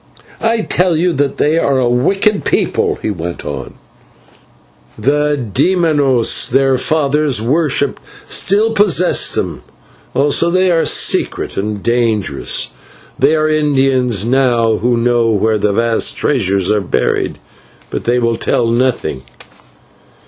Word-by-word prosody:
"I 225 Hz, 0 st, +1 dB
tell 180 Hz, -5 st, 0 dB
you 175 Hz, +2 st, +1 dB
that 140 Hz, -2 st, -1 dB
they 155 Hz, +3 st, +1 dB
are 140 Hz, -4 st, +1 dB
a 125 Hz, -2 st, +1 dB
wicked 195 Hz, -, +1 dB
people," -, -, 0 dB
he -, -, -1 dB
went 85 Hz, -2 st, -6 dB
on, 70 Hz, -1 st, -6 dB, 1.2 s
"the 145 Hz, +5 st, 0 dB, 0.2 s
/demonios/ 145 Hz, -7 st, +2 dB
their 135 Hz, 0 st, +2 dB
fathers 150 Hz, -3 st, 0 dB
worshipped 145 Hz, +6 st, 0 dB, 0.2 s
still 215 Hz, +4 st, +1 dB
possess 195 Hz, -4 st, +2 dB
them, -, -, -3 dB, 0.5 s
also 145 Hz, +4 st, +2 dB
they 185 Hz, +1 st, +2 dB
are 165 Hz, -1 st, +1 dB
secret -, -, 0 dB
and 105 Hz, 0 st, -4 dB
dangerous; 115 Hz, -, -1 dB, 0.5 s
there 155 Hz, +4 st, +2 dB
are 155 Hz, -, +1 dB
Indians 135 Hz, -7 st, +1 dB
now 120 Hz, -3 st, +2 dB
who 120 Hz, +1 st, 0 dB
know 120 Hz, -1 st, +1 dB
where 110 Hz, 0 st, +1 dB
vast 110 Hz, +3 st, 0 dB
treasures 100 Hz, -8 st, 0 dB
are 105 Hz, -1 st, +1 dB
buried, 95 Hz, -, -1 dB, 0.5 s
but -, -, -5 dB
they 120 Hz, +1 st, +1 dB
will 115 Hz, -1 st, 0 dB
tell 120 Hz, -, 0 dB
nothing. 115 Hz, -, -1 dB
130 Hz, 125 wpm, -14 LUFS, 115-155 Hz, 1.2 s, demonios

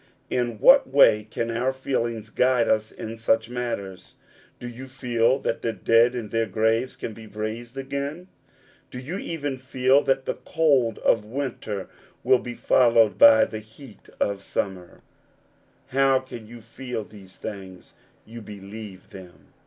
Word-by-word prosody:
In 120 Hz, -2 st, -1 dB
what 270 Hz, -, +6 dB
way 105 Hz, -6 st, +5 dB
can 115 Hz, +1 st, -3 dB
our 125 Hz, +3 st, 0 dB
feelings 115 Hz, -4 st, -3 dB
guide 125 Hz, -2 st, +2 dB
us 110 Hz, 0 st, +1 dB
in 115 Hz, +1 st, -7 dB
such 115 Hz, 0 st, +1 dB
matters? 115 Hz, -6 st, -5 dB, 0.4 s
Do 125 Hz, -, -7 dB
you 120 Hz, +2 st, -9 dB
feel 125 Hz, -1 st, +1 dB
that 115 Hz, -4 st, -3 dB
the 115 Hz, -, -1 dB
dead 115 Hz, +3 st, +3 dB
in 115 Hz, -4 st, -5 dB
their 115 Hz, +1 st, 0 dB
graves 110 Hz, +5 st, 0 dB
can 110 Hz, -, -6 dB
be 110 Hz, +1 st, -12 dB
raised 110 Hz, +4 st, -6 dB
again? 140 Hz, +6 st, -4 dB, 0.6 s
Do -, -, -9 dB
you 150 Hz, +10 st, -5 dB
even 145 Hz, -7 st, -4 dB
feel 130 Hz, +1 st, +2 dB
that 135 Hz, 0 st, +1 dB
the -, -, -3 dB
cold 135 Hz, -8 st, +2 dB
of 110 Hz, -, +3 dB
winter 110 Hz, -4 st, -4 dB, 0.4 s
will 130 Hz, +1 st, +4 dB
be 120 Hz, 0 st, -7 dB
followed 115 Hz, -6 st, +3 dB
by 110 Hz, -1 st, +8 dB
the 110 Hz, -, -6 dB
heat 110 Hz, +2 st, -15 dB
of 100 Hz, -1 st, -1 dB
summer? 95 Hz, -3 st, -4 dB, 0.9 s
How 135 Hz, 0 st, +3 dB
can 120 Hz, -4 st, -10 dB
you 120 Hz, +1 st, -11 dB
feel 120 Hz, 0 st, -6 dB
these 100 Hz, -3 st, -14 dB
things? 95 Hz, -4 st, -9 dB, 0.3 s
You 115 Hz, +1 st, -10 dB
believe 100 Hz, -1 st, -10 dB
them. 90 Hz, -2 st, -14 dB
115 Hz, 155 wpm, -24 LUFS, 110-130 Hz, 0.9 s, by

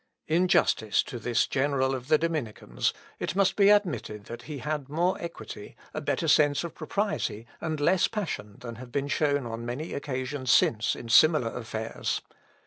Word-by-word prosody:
In 170 Hz, +4 st, +3 dB
justice 110 Hz, -, +3 dB
to 120 Hz, -, -7 dB
this 120 Hz, +1 st, +1 dB
general 135 Hz, -1 st, +1 dB
of 130 Hz, -1 st, -5 dB
the 155 Hz, -, +5 dB
Dominicans, 145 Hz, -, -2 dB, 0.3 s
it -, -, -3 dB
must 195 Hz, -1 st, +3 dB
be 200 Hz, -1 st, +5 dB
admitted 175 Hz, -, +1 dB
that 120 Hz, -, -8 dB
he 150 Hz, -, -4 dB
had 150 Hz, 0 st, -3 dB
more 175 Hz, +5 st, +1 dB
equity, 170 Hz, 0 st, -8 dB, 0.2 s
a -, -, -3 dB
better -, -, -1 dB
sense 145 Hz, 0 st, +4 dB
of 170 Hz, -, -5 dB
propriety, 165 Hz, -, -2 dB
and 155 Hz, -2 st, -3 dB
less 175 Hz, +5 st, +3 dB
passion, 105 Hz, -, -4 dB
than 115 Hz, -2 st, -7 dB
have 125 Hz, 0 st, -10 dB
been 140 Hz, +2 st, -1 dB
shown 145 Hz, -3 st, +1 dB
on 115 Hz, 0 st, -5 dB
many 125 Hz, +7 st, -4 dB
occasions 130 Hz, -1 st, -4 dB
since, 115 Hz, 0 st, +3 dB
in 120 Hz, -, -8 dB
similar 150 Hz, -2 st, +5 dB
affairs. 110 Hz, -2 st, -3 dB
140 Hz, 170 wpm, -28 LUFS, 120-160 Hz, 0.3 s, the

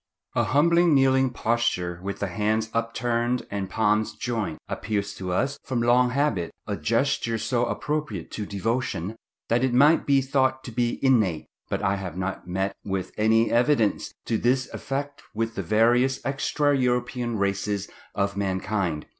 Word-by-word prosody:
A -, -, +2 dB
humble 170 Hz, +5 st, +4 dB
kneeling 135 Hz, -3 st, +4 dB
posture, 115 Hz, -8 st, -1 dB
with 100 Hz, +1 st, -4 dB
the 100 Hz, -, -2 dB
hands 110 Hz, +4 st, 0 dB
upturned 120 Hz, +1 st, -1 dB
and 100 Hz, -2 st, -3 dB
palms 110 Hz, +1 st, +1 dB
joined, 115 Hz, -9 st, -3 dB
appears 105 Hz, -2 st, -2 dB
to 90 Hz, -1 st, -4 dB
us, 135 Hz, +9 st, 0 dB
from 130 Hz, -3 st, -2 dB
long 125 Hz, +1 st, +4 dB
habit, 125 Hz, -, 0 dB, 0.2 s
a -, -, -2 dB
gesture 115 Hz, -1 st, 0 dB
so 120 Hz, +3 st, 0 dB
appropriate 145 Hz, -, -3 dB
to 105 Hz, -2 st, -4 dB
devotion, 105 Hz, -2 st, -2 dB, 0.3 s
that 120 Hz, +2 st, +2 dB
it 130 Hz, -2 st, +1 dB
might 145 Hz, +5 st, +5 dB
be 140 Hz, -1 st, +5 dB
thought 130 Hz, -1 st, +1 dB
to 120 Hz, -, -7 dB
be 120 Hz, +1 st, 0 dB
innate; 105 Hz, -12 st, +3 dB, 0.2 s
but -, -, -2 dB
I 100 Hz, +1 st, +1 dB
have 90 Hz, -3 st, -6 dB
not 95 Hz, -1 st, -4 dB
met 95 Hz, +2 st, -2 dB
with 95 Hz, -2 st, -3 dB
any 110 Hz, +1 st, +3 dB
evidence 120 Hz, -3 st, +2 dB
to 110 Hz, -, 0 dB
this 130 Hz, +2 st, +1 dB
effect 140 Hz, +1 st, -4 dB
with 115 Hz, +1 st, -1 dB
the 100 Hz, -, -3 dB
various 120 Hz, +7 st, +3 dB
extra 145 Hz, +2 st, +1 dB
European 125 Hz, -2 st, 0 dB
races 100 Hz, 0 st, -1 dB, 0.3 s
of 100 Hz, 0 st, 0 dB
mankind. 95 Hz, -4 st, -1 dB
115 Hz, 155 wpm, -25 LUFS, 100-130 Hz, 0.3 s, might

